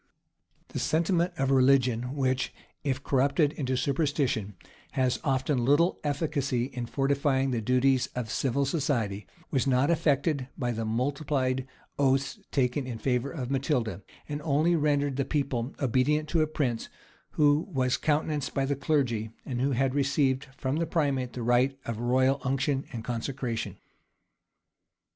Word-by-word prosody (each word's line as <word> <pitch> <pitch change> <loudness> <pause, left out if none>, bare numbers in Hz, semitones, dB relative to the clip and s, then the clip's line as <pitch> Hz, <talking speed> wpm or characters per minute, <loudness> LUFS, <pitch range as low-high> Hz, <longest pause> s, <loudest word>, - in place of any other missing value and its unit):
] - - -41
The - - -4
sentiment 170 +2 +1
of 135 0 +1
religion 130 -1 +3
which, 130 -2 0 0.3
if 140 -1 -1
corrupted 140 +3 +2
into 130 -3 -1
superstition, 140 - 0 0.4
has 130 -2 +1
often 130 -2 +1
little 145 +8 +3
efficacy 145 -4 0
in 125 -2 -5
fortifying 135 0 +1
the 120 -2 -1
duties 130 +2 +2
of 120 -3 -3
civil 140 +1 0
society, 120 - -1 0.2
was 135 -1 +1
not 135 +4 +3
affected 150 -4 +1
by 125 -2 -1
the 115 -1 -3
multiplied 130 +2 -1 0.3
oaths 135 0 +1
taken 130 0 0
in 120 -3 -4
favor 125 +2 0
of 135 -4 -5
Matilda, 130 - 0 0.3
and 150 0 -4
only 155 +3 +2
rendered 145 -3 +1
the 140 - +2
people 135 -4 -2
obedient 140 +4 +1
to 165 - +2
a 155 - +2
prince 130 -7 -2 0.4
who 150 +1 +3
was 130 -3 +1
countenanced 150 -1 -1
by 135 - +1
the 140 +1 0
clergy, 130 -7 0 0.2
and 125 -2 -3
who 135 +1 +1
had 130 +1 +1
received 140 -1 +1
from 135 +2 -1
the 165 0 0
primate 135 -7 0
the 120 - -4
rite 125 +3 +2
of 115 -2 -4
royal 130 +3 +2
unction 135 +1 0
and 115 -4 -5
consecration. 115 -4 -3
135 Hz, 150 wpm, -28 LUFS, 125-145 Hz, 0.4 s, religion